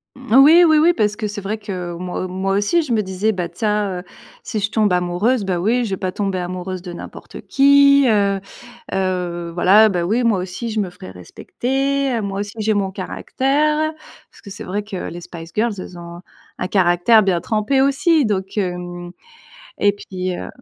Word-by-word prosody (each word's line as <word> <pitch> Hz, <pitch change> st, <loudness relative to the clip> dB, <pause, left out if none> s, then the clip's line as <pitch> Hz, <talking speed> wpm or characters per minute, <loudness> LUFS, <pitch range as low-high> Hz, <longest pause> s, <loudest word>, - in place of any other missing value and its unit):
Mmh 255 Hz, -3 st, -2 dB
oui, 330 Hz, +4 st, +7 dB
oui, 315 Hz, -2 st, +5 dB
oui, 335 Hz, +3 st, +5 dB
parce 210 Hz, -5 st, 0 dB
que 215 Hz, 0 st, -3 dB
c'est 205 Hz, 0 st, -6 dB
vrai 205 Hz, +3 st, -3 dB
que 185 Hz, -5 st, -6 dB
moi 180 Hz, +1 st, -4 dB
moi 190 Hz, +1 st, -2 dB
aussi, 205 Hz, +13 st, +2 dB
je 260 Hz, -6 st, -2 dB
me 215 Hz, -, +2 dB
disais: 190 Hz, +2 st, -1 dB
«Bah, 180 Hz, -4 st, -3 dB
tiens, 210 Hz, -4 st, -1 dB
heu, -, -, -17 dB, 0.4 s
si 220 Hz, -, -3 dB
je 205 Hz, 0 st, -1 dB
tombe 210 Hz, -4 st, +1 dB
amoureuse, 180 Hz, +7 st, +1 dB
bah, 185 Hz, -2 st, -1 dB
oui, 235 Hz, +7 st, +1 dB
je -, -, -4 dB
vais 190 Hz, -, -1 dB
pas 185 Hz, 0 st, -3 dB
tomber 195 Hz, -1 st, -2 dB
amoureuse 180 Hz, 0 st, -5 dB
de 175 Hz, -2 st, -7 dB
n'importe -, -, -10 dB
qui, 280 Hz, 0 st, +5 dB
heu 200 Hz, -3 st, +2 dB, 0.5 s
heu, 180 Hz, -3 st, -2 dB
voilà, 205 Hz, +5 st, +6 dB
bah, 180 Hz, -4 st, -1 dB
oui 225 Hz, +7 st, +1 dB
moi 225 Hz, -4 st, +2 dB
aussi 185 Hz, +6 st, -5 dB
je 220 Hz, -1 st, -2 dB
me 190 Hz, -4 st, -2 dB
ferai 180 Hz, -, -11 dB
respecter, 270 Hz, -, -2 dB
heu, 230 Hz, -, -1 dB
moi 200 Hz, -1 st, -3 dB
aussi 205 Hz, +1 st, -6 dB
j'ai 215 Hz, 0 st, +1 dB
mon 195 Hz, -2 st, -1 dB
caractère». 300 Hz, +10 st, -1 dB, 0.4 s
Parce -, -, -19 dB
que 200 Hz, -, -10 dB
c'est 205 Hz, -, -8 dB
vrai 205 Hz, +3 st, -3 dB
que 205 Hz, -2 st, -7 dB
les 175 Hz, +1 st, -8 dB
Spice 165 Hz, -1 st, -10 dB
Girls, 225 Hz, +1 st, +1 dB
elles 185 Hz, -1 st, -9 dB
ont 170 Hz, 0 st, -10 dB, 0.4 s
un 180 Hz, -, -2 dB
caractère 185 Hz, +4 st, +4 dB
bien 180 Hz, -3 st, +1 dB
trempé 220 Hz, +5 st, +1 dB
aussi 295 Hz, +3 st, +3 dB
donc 190 Hz, -2 st, -3 dB
hem 175 Hz, -1 st, -4 dB, 0.7 s
et 205 Hz, -, +3 dB
puis 185 Hz, -2 st, -5 dB
heu -, -, -6 dB
200 Hz, 200 wpm, -19 LUFS, 180-230 Hz, 0.7 s, oui